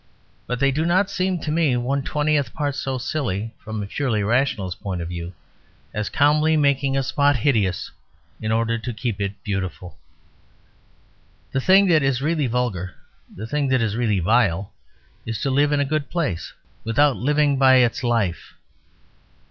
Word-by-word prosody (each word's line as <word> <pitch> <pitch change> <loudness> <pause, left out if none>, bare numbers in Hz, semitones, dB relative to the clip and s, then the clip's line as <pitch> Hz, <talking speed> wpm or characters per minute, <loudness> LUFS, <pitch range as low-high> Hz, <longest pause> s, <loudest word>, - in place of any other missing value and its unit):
But 125 -1 -2
they 140 0 +3
do 150 +4 -1
not 185 +4 +2
seem 185 -1 0
to 150 - -3
me 155 -6 +2
one 135 +3 -1
twentieth 150 0 0
part 145 -2 -1
so 135 -1 -3
silly, 120 -5 -3
from 110 -1 -5
a - - -4
purely 110 -1 -1
rationalist 110 -5 0
point 95 -3 -3
of 85 0 -5
view, 85 0 -5 0.6
as 105 0 -2
calmly 150 +2 +3
making 140 -2 +2
a 135 - +1
spot 145 +1 +2
hideous 105 -7 0 0.5
in 110 - -2
order 115 +1 0
to 115 +2 -5
keep 110 -2 -3
it 100 0 -1
beautiful." 95 -3 -5 1.5
The 135 - -1
thing 190 +6 +5
that 160 -3 +5
is 135 -2 +1
really 150 0 0
vulgar, 115 -7 -2 0.4
the 105 - -8
thing 145 +3 -1
that 130 -1 +2
is 110 -2 -1
really 110 -4 +1
vile, 95 -1 +1 0.5
is 115 -1 -4
to 135 - 0
live 145 +2 +3
in 145 - +2
a 145 - +2
good 150 0 -2
place 150 - -2 0.3
Without 135 +5 +3
living 145 +1 +1
by 130 -1 +6
its 120 -1 +2
life. 115 -8 -1
130 Hz, 170 wpm, -22 LUFS, 110-145 Hz, 1.5 s, by